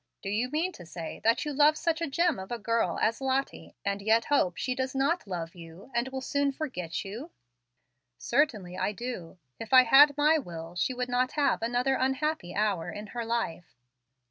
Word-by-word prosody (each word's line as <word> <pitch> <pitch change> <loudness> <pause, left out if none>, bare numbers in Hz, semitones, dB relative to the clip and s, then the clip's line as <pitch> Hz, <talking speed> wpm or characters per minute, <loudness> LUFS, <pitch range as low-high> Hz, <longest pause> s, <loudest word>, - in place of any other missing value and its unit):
Do 195 - -3
you 230 +5 0
mean 320 +6 0
to 250 - -12
say 165 -1 -7
that 230 +6 +2
you 295 - -3
love 300 +2 +5
such 335 0 -1
a 335 - 0
gem 335 - +1
of 190 +3 -8
a 240 - -1
girl 230 +1 0
as 225 +3 +1
Lottie, 270 +1 -2
and 200 0 -1
yet 220 +2 +3
hope 185 - +1
she 255 - -1
does 260 +1 -3
not 280 +2 +1
love 170 -3 -4
you, 170 +6 -13
and 235 +2 0
will 265 0 -5
soon 280 +1 0
forget 205 - -4
you?" 230 - -7 0.9
"Certainly 225 -10 0
I 210 - 0
do. 210 -8 -6 0.2
If 225 +3 -6
I 255 0 +9
had 285 +4 +7
my 305 +2 +4
will, 165 - -8
she 250 +8 -1
would 250 0 -2
not 250 +1 0
have 285 -6 +1
another 245 +3 +1
unhappy 265 - -1
hour 200 -5 0
in 210 - -7
her 240 -1 -3
life." 225 - -3
245 Hz, 195 wpm, -29 LUFS, 200-280 Hz, 0.9 s, I